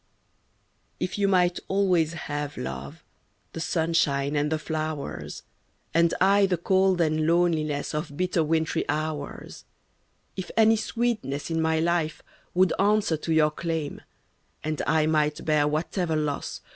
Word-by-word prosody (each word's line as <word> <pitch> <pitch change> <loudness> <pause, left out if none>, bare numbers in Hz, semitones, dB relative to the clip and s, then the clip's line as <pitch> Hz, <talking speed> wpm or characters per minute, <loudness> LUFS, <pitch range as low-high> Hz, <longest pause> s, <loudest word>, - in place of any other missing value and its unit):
F 185 +3 -3
you 200 - +3
might 180 -2 +3
always 180 -5 +2
have, 145 -3 -4
love, 65 +1 -6 0.5
The - - -5
sunshine 160 -4 +1
and 150 +1 +1
the 160 - +2
flowers, 155 -2 -4 0.5
And 170 0 +4
I 195 +1 +5
the 180 -2 0
cold 190 +1 +2
and 155 -1 +1
loneliness 160 -4 +1
Of 150 -1 -4
bitter 180 -2 +1
wintry 160 0 0
hours, 155 -2 -4 0.4
— - - -43 0.3
If 185 -2 -5
any 225 0 +6
sweetness 215 - -2
in 165 0 +1
my 160 0 +2
life 165 -1 0 0.3
Would 185 0 +4
answer 205 -4 +3
to 160 - -4
your 155 -1 +4
claim, 160 -2 -3 0.6
And 155 0 -2
I 155 0 +3
might 150 -1 +1
bear 150 -2 +3
whatever 160 +2 -1
loss. 150 -2 -2
160 Hz, 140 wpm, -26 LUFS, 150-180 Hz, 0.6 s, any